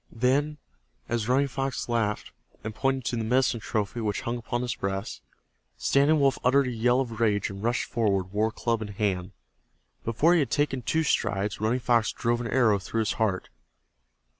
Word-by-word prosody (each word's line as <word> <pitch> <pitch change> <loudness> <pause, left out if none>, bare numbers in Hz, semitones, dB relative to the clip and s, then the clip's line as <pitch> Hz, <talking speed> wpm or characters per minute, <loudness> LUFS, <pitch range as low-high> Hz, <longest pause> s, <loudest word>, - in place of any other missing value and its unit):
Then, 140 +6 +1 0.5
as 115 -1 -2
Running 135 +3 +3
Fox 135 0 -3
laughed 115 -3 -1 0.3
and 110 - -4
pointed 135 +1 -1
to 120 - -1
the 115 - -1
medicine 125 +1 +2
trophy 110 +2 -2
which 105 -2 -1
hung 120 -2 -2
upon 120 +1 -3
his 125 - -1
breast, 95 +1 -4 0.6
Standing 145 +3 +3
Wolf 135 -1 +2
uttered 135 +2 +4
a 125 - -2
yell 120 +2 +2
of 115 -4 -5
rage 105 -3 +1
and 100 0 -8
rushed 120 +2 0
forward, 100 -5 0
war 110 +2 +1
club 115 +1 -1
in 110 - -4
hand. 100 -3 -2 0.7
Before 130 +10 +3
he 175 - +4
had 140 - 0
taken 145 -3 0
two 160 +9 0
strides 105 -7 0
Running 115 +4 +1
Fox 120 -2 +2
drove 120 +1 -1
an 120 - -3
arrow 115 -5 +3
through 115 +4 -2
his 110 - 0
heart. 100 -4 0
115 Hz, 185 wpm, -27 LUFS, 105-130 Hz, 0.7 s, uttered